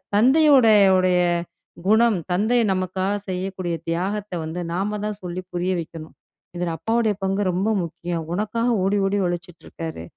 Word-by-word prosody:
தந்தையுடைய 255 Hz, -3 st, +6 dB, 0.2 s
உடைய 180 Hz, -1 st, +3 dB, 0.7 s
குணம், 220 Hz, -1 st, +4 dB
தந்தை 220 Hz, +7 st, +2 dB
நமக்காக 185 Hz, +1 st, -1 dB, 0.2 s
செய்யக்கூடிய 185 Hz, -1 st, -3 dB
தியாகத்த 195 Hz, +4 st, -2 dB
வந்து 170 Hz, +3 st, -4 dB
நாம 205 Hz, +3 st, -2 dB
தான் 210 Hz, -1 st, -4 dB
சொல்லி 180 Hz, +1 st, -5 dB
புரிய 180 Hz, +1 st, -1 dB
வைக்கணும். 160 Hz, -1 st, -10 dB, 0.4 s
இதுல 175 Hz, -1 st, -2 dB
அப்பாவுடைய 225 Hz, -2 st, +1 dB
பங்கு 195 Hz, +1 st, 0 dB
ரொம்ப 190 Hz, +5 st, 0 dB
முக்கியம். 170 Hz, 0 st, -4 dB
உனக்காக 230 Hz, +4 st, -1 dB
ஓடி 200 Hz, +2 st, +1 dB
ஓடி 200 Hz, +1 st, 0 dB
உழைச்சிட்ருக்காரு. 170 Hz, -, -6 dB
190 Hz, 130 wpm, -22 LUFS, 175-210 Hz, 0.7 s, தந்தையுடைய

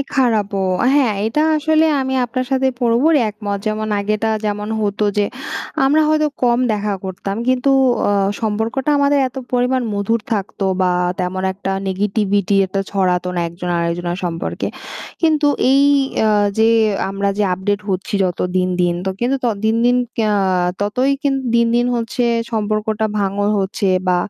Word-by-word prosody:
এ -, -, +1 dB
খারাপও 215 Hz, -6 st, +1 dB, 0.4 s
হ্যাঁ 265 Hz, -6 st, +3 dB
এটা 225 Hz, +7 st, 0 dB, 0.2 s
আসলে 315 Hz, +1 st, +2 dB, 0.2 s
আমি 265 Hz, 0 st, -2 dB
আপনার 255 Hz, +2 st, -3 dB
সাথে 265 Hz, 0 st, +2 dB
পুরোপুরি 250 Hz, +7 st, +3 dB
একমত। 205 Hz, -1 st, -4 dB
যেমন 215 Hz, 0 st, -1 dB
আগেটা 215 Hz, +2 st, -1 dB, 0.2 s
যেমন 210 Hz, 0 st, -3 dB
হতো 210 Hz, 0 st, -1 dB
যে 205 Hz, -, +3 dB, 0.6 s
আমরা 295 Hz, +3 st, +4 dB
হয়তো 305 Hz, 0 st, +2 dB, 0.2 s
কম 240 Hz, -1 st, +3 dB
দেখা 210 Hz, 0 st, -1 dB
করতাম 195 Hz, +1 st, -4 dB
কিন্তু 255 Hz, +1 st, +2 dB, 0.4 s
অ -, -, +2 dB, 0.3 s
সম্পর্কটা 225 Hz, +5 st, -1 dB
আমাদের 285 Hz, 0 st, +3 dB
এত 255 Hz, -, -23 dB, 0.2 s
পরিমাণ 250 Hz, +1 st, +1 dB
মধুর 205 Hz, +3 st, 0 dB
থাকতো 200 Hz, -1 st, -3 dB, 0.2 s
বা 185 Hz, -1 st, +2 dB, 0.3 s
তেমন 185 Hz, +1 st, -2 dB
একটা 195 Hz, 0 st, -5 dB, 0.2 s
negativity 200 Hz, 0 st, 0 dB
একটা 195 Hz, +1 st, -2 dB
ছড়াতো 180 Hz, -2 st, 0 dB
না -, -, +1 dB
একজন 170 Hz, +1 st, -7 dB
আরেকজনার 175 Hz, +1 st, -2 dB
সম্পর্কে। 165 Hz, -1 st, -3 dB, 0.6 s
কিন্তু 310 Hz, -2 st, +3 dB, 0.3 s
এই 275 Hz, +1 st, +5 dB, 0.4 s
অ্যা 220 Hz, -, +3 dB, 0.3 s
যে 220 Hz, 0 st, +5 dB, 0.4 s
আমরা 200 Hz, 0 st, -1 dB
যে -, -, +2 dB
আপডেট 200 Hz, +2 st, -2 dB
হচ্ছি 190 Hz, +2 st, -3 dB
যত 180 Hz, -2 st, -2 dB, 0.2 s
দিন, 185 Hz, 0 st, +2 dB
দিন, 175 Hz, -1 st, +2 dB
তো -, -, +1 dB
কিন্তু 250 Hz, +3 st, +1 dB
ত -, -, +3 dB, 0.2 s
দিন, 220 Hz, +1 st, +2 dB
দিন 245 Hz, +1 st, +4 dB, 0.2 s
ক্যা 220 Hz, -2 st, +1 dB, 0.5 s
ততই 250 Hz, +7 st, +1 dB
কিন 280 Hz, -1 st, +1 dB, 0.2 s
দিন, 235 Hz, 0 st, +4 dB
দিন 240 Hz, 0 st, +2 dB
হচ্ছে 235 Hz, +2 st, -2 dB, 0.3 s
সম্পর্কটা 215 Hz, 0 st, -1 dB
ভাঙন 200 Hz, 0 st, 0 dB
হচ্ছে 195 Hz, +1 st, -2 dB, 0.2 s
বা 180 Hz, -, +3 dB
215 Hz, 160 wpm, -18 LUFS, 195-250 Hz, 0.6 s, এই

